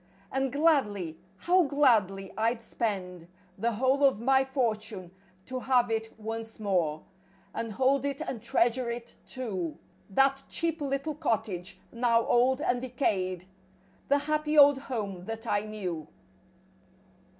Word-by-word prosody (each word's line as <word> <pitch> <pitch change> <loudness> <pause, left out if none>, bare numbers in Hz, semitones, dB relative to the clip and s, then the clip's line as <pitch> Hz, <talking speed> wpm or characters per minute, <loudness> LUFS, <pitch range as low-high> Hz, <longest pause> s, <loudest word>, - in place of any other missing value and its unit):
And 270 -1 0
gladly, 210 - +1 0.2
how 365 +1 +3
gladly. 220 -10 +2
I'd 225 +2 +1
spend 185 -7 -4 0.3
The 235 +3 0
whole 260 +5 +2
of 270 -6 +4
my 265 +3 +4
fortune 220 -8 -2 0.3
to 255 0 -4
have 250 -2 +2
it 225 0 -1
once 225 +1 -6
more. 175 -7 0 0.5
And 225 -2 -4
hold 265 +3 +2
it 280 0 -2
and 265 -7 -4
treasure 240 +2 +1
it, 235 0 -6
too— 195 - -4 0.3
That 270 +6 +3
cheap 330 -2 -1
little 275 +2 -1
cottage, 195 - -2
now 235 -1 +2
old 260 +3 +3
and 245 -4 +1
decayed— 190 -8 -1 0.6
The 285 - +4
happy 305 +1 0
old 285 -1 +8
home 205 -9 -5
that 225 +2 -6
I 205 -3 +1
knew. 180 -8 -5
235 Hz, 130 wpm, -29 LUFS, 205-270 Hz, 0.6 s, old